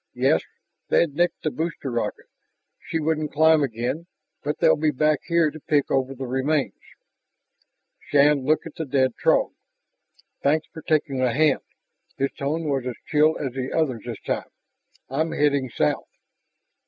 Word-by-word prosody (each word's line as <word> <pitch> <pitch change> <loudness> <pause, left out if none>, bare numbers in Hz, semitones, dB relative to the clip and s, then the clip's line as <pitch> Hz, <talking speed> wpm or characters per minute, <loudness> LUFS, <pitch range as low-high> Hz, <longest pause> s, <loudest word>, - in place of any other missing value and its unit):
"Yes, - - +3 0.5
they'd 165 -4 +3
nicked 175 +4 0
the 155 - 0
booster 160 -4 -3
rocket; 115 -3 -3 0.5
she - - -3
wouldn't 155 -1 -1
climb 160 +1 +5
again. 130 +6 -2 0.4
But 150 +1 -2
they'll - - +5
be 155 0 +1
back 150 +1 +2
here 170 -2 +3
to 155 - -10
pick 145 -1 0
over 135 0 0
the 130 +1 -5
remains." 135 +3 0 1.3
Shann 145 -1 +4
looked 155 +3 +1
at - - -8
the 160 - -3
dead 130 -2 +1
Throg. - - +3 0.9
"Thanks 155 +2 +2
for 160 - -8
taking 145 -4 0
a 125 -2 +2
hand." 155 +4 +3 0.6
His 135 0 0
tone 150 +4 -2
was 135 -3 -1
as 125 - -3
chill 155 +1 +3
as 135 -4 -4
the 130 0 -4
other's 130 -9 -1
this 115 -4 -5
time. - - -3 0.6
"I'm 155 +5 -1
heading 140 -3 +1
south...." 75 -9 -1
145 Hz, 155 wpm, -24 LUFS, 130-155 Hz, 1.3 s, climb